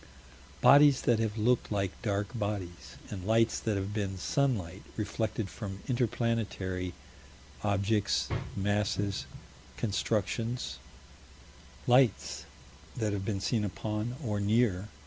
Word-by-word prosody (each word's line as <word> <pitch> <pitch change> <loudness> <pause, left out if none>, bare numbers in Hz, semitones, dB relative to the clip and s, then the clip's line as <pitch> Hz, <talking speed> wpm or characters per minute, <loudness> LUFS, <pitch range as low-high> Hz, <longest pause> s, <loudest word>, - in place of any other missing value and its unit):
Bodies 140 +1 +7
that 120 -2 +3
have 110 -1 -1
looked 120 +2 +2
like 100 -3 0
dark 100 -2 -1
bodies, 100 -6 -4
and 95 -3 -5
lights 110 +2 +3
that 110 - -1
may 100 - 0
have 100 +2 -4
been 100 -3 -2
sunlight 100 -6 0 0.2
reflected 110 0 -2
from 95 -1 -7
inter 125 -3 +1
planetary 100 -6 -2 0.7
objects, 100 0 +1 0.3
masses, 100 0 0 0.5
constructions 115 +3 -1 1.1
Lights 125 -2 +3 0.5
that 110 -3 0
have 100 -1 -2
been 100 -2 -1
seen 110 +2 +1
upon 105 +4 -3
or 105 -4 -1
near? 105 -2 +2
105 Hz, 115 wpm, -31 LUFS, 100-115 Hz, 1.1 s, Bodies